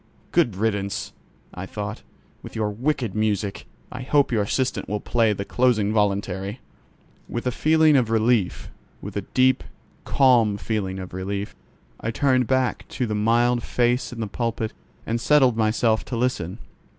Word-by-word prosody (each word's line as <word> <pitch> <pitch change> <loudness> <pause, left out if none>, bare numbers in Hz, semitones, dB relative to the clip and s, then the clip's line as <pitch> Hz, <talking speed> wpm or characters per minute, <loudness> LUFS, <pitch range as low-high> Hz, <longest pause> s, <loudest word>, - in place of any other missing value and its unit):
"Good 110 - +2
riddance!" 100 -1 -2 0.4
I 95 +1 -6
thought, 105 +1 -5 0.4
"with - - -11
your 110 -2 -1
wicked 120 -1 -1
music! 105 -2 -1 0.2
I 125 - -6
hope 140 +1 +2
your 110 -3 +2
assistant 130 +4 -1
will 105 +1 -1
play 115 +1 +2
the 100 -1 -3
closing 110 -4 +2
voluntary." 100 0 -1 0.7
With 120 - -4
a 125 - +1
feeling 155 +3 +4
of 125 -5 +3
relief—with 115 -3 -1
a - - -1
deep, 130 0 +4 0.4
calm 120 -6 +4
feeling 100 -3 -2
of 95 -2 -7
relief, 100 +2 -4 0.4
I 110 - -3
turned 130 0 +2
back 130 -1 0
to 125 - +1
the 110 - -3
mild 120 +3 +2
face 120 +1 0
in 115 -2 -6
the - - -1
pulpit 110 +1 -3 0.3
and 115 +1 -2
settled 135 -5 +4
myself 110 0 +2
to 120 - -4
listen. 110 -7 -1
115 Hz, 150 wpm, -23 LUFS, 105-125 Hz, 0.7 s, feeling